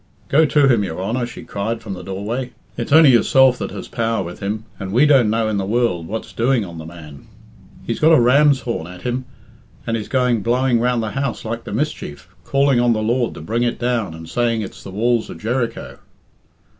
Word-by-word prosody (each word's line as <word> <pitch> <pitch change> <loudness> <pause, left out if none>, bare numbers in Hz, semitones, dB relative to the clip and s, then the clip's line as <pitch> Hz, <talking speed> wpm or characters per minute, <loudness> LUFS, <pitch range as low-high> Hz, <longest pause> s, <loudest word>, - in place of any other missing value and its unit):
"Go 155 +3 +4
to 145 -1 +4
him, 120 -6 +3
your 90 -3 -5
Honour," 120 +6 -2
she 120 - -10
cried 110 +3 -4
from 100 - -5
the 90 - -7
doorway. 105 +7 -4 0.2
"It's 115 +2 -5
only 155 -2 +8
yourself 130 +1 +4
that - - -3
has - - -8
power 115 -3 -1
with 85 0 -8
him, 105 +2 -4
and 95 -1 -5
we 125 +8 +4
don't 135 -7 +5
know 110 0 +1
in 110 -1 -1
the 100 - -1
world 105 -7 0
what's 110 +4 -6
doing 120 -2 +1
on 85 -2 -9
the 80 - -8
man. 75 -4 -12 0.6
He's 115 - -3
got 160 +1 +5
a 160 - +7
ram's 140 +3 +4
horn 115 -10 -4
at 90 0 -11
him, 125 +1 -2 0.6
and 115 -2 -1
is 110 -2 -4
going 125 -4 +1
blowing 125 +2 +2
round 120 -1 +1
the 110 - -3
house 135 -2 -3
like 115 +1 -4
the - - -7
mischief, 95 - -4
calling 140 -2 +2
on 120 -1 +3
the 110 -1 -1
Lord 120 +2 0
to - - -9
bring 115 +9 -2
it 120 -1 0
down, 120 -8 -1
and 80 0 -10
saying 115 +4 0
it's 95 - -9
the - - -9
walls 115 +3 0
of - - -9
Jericho." 120 +2 -3
115 Hz, 220 wpm, -20 LUFS, 100-125 Hz, 0.6 s, only